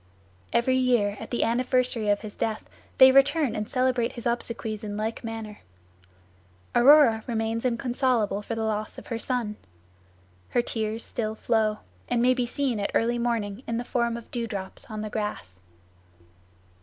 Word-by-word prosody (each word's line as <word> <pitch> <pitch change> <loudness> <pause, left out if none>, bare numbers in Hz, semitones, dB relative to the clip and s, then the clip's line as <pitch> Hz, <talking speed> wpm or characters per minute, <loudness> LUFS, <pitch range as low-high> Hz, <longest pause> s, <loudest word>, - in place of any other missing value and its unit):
Every 255 +2 +2
year 240 -6 +2
at - - -8
the 240 - 0
anniversary 250 -2 +1
of 205 0 +2
his 210 -1 -8
death 220 -1 -3 0.3
they 260 -1 +9
return 275 +1 +3
and 210 0 -3
celebrate 255 -2 +1
his 235 - -8
obsequies 230 -2 -2
in 205 -1 -4
like 220 +3 -3
manner. 225 -2 -6 1.1
Aurora 240 -3 +6
remains 225 0 -1
inconsolable 240 -4 0
for 225 +2 -4
the 225 - -2
loss 215 -1 -2
of - - -10
her 230 -2 -4
son. 230 -4 -2 0.9
Her 240 - +1
tears 220 -1 -3
still 220 -2 -2
flow, 220 -2 0 0.3
and 245 - +1
may 250 +2 +4
be 250 -1 -1
seen 255 -3 -1
at 200 - -1
early 235 +1 +2
morning 230 -3 -1
in 230 - -1
the 240 - -2
form 235 -2 0
of 235 - -12
dew 235 -2 -2
drops 195 -3 -5
on 215 -1 -5
the 215 - -4
grass. 95 - -4
230 Hz, 165 wpm, -26 LUFS, 215-245 Hz, 1.1 s, they